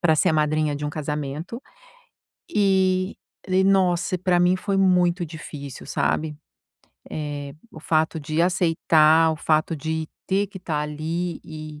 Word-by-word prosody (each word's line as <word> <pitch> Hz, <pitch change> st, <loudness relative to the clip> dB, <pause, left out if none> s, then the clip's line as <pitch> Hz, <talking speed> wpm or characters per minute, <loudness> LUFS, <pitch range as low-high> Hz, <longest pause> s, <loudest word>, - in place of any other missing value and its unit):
pra 160 Hz, -2 st, +3 dB
ser 180 Hz, -, +3 dB
a -, -, +1 dB
madrinha 155 Hz, -1 st, +1 dB
de 145 Hz, +1 st, -5 dB
um 145 Hz, -, -2 dB
casamento 150 Hz, -, -4 dB, 0.9 s
e 190 Hz, -1 st, +2 dB, 0.3 s
e, 190 Hz, 0 st, +3 dB
nossa, 185 Hz, -2 st, +2 dB
pra 180 Hz, 0 st, +2 dB
mim 180 Hz, +1 st, +4 dB
foi 200 Hz, +1 st, -2 dB
muito 180 Hz, -2 st, +3 dB
difícil, 150 Hz, -4 st, -9 dB
sabe, 150 Hz, +2 st, -1 dB, 0.8 s
eh, 145 Hz, -2 st, -5 dB, 0.2 s
o 160 Hz, -, -10 dB
fato 160 Hz, +1 st, +1 dB
de 155 Hz, +2 st, -2 dB
aceitar, 165 Hz, -3 st, +4 dB
o -, -, -5 dB
fato 155 Hz, +1 st, +1 dB
de 160 Hz, +1 st, -3 dB, 0.2 s
ter 195 Hz, +2 st, +2 dB
que 190 Hz, -, -9 dB
tá 160 Hz, -4 st, -2 dB
ali 160 Hz, +3 st, -3 dB
e, 155 Hz, -1 st, -9 dB
160 Hz, 145 wpm, -23 LUFS, 155-185 Hz, 0.9 s, mim